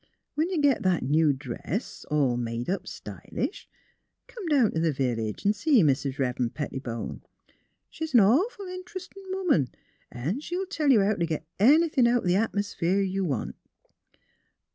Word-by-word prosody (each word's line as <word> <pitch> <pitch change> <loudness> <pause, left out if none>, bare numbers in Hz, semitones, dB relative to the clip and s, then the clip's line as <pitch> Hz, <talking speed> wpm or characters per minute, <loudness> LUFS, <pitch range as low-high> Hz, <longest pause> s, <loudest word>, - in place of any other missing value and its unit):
When 315 +4 0
you 365 -4 -1
git 285 -4 +3
that 185 -3 +1
new 150 +3 +3
dress, 140 - -5
all 145 -5 +2
made 120 +4 -3
up 195 - -3
stylish, - - -6 0.6
come 435 -8 -8
down 275 -8 +4
t' 160 - -2
the 165 -1 +2
village 120 - -2
an' 205 - +4
see 230 - +3
Mis' 140 -1 +2
Eev'ren' 130 -3 -1
Pettibone. 130 -5 -5 0.7
She's 320 -4 -4
an 235 - +9
awful 360 - +2
interestin' 365 +1 -8
woman 360 - +2 0.4
an' 150 - -3
she'll 355 +5 -3
tell 320 -6 -1
you 235 -6 +6
how 200 +2 +2
t' 170 -4 -1
git 160 -1 -3
anythin' 280 - +5
out 240 -2 +2
th' 180 - +2
atmosphere 200 -3 0
you 195 0 0
want. 140 -10 -2
195 Hz, 155 wpm, -27 LUFS, -, 0.7 s, an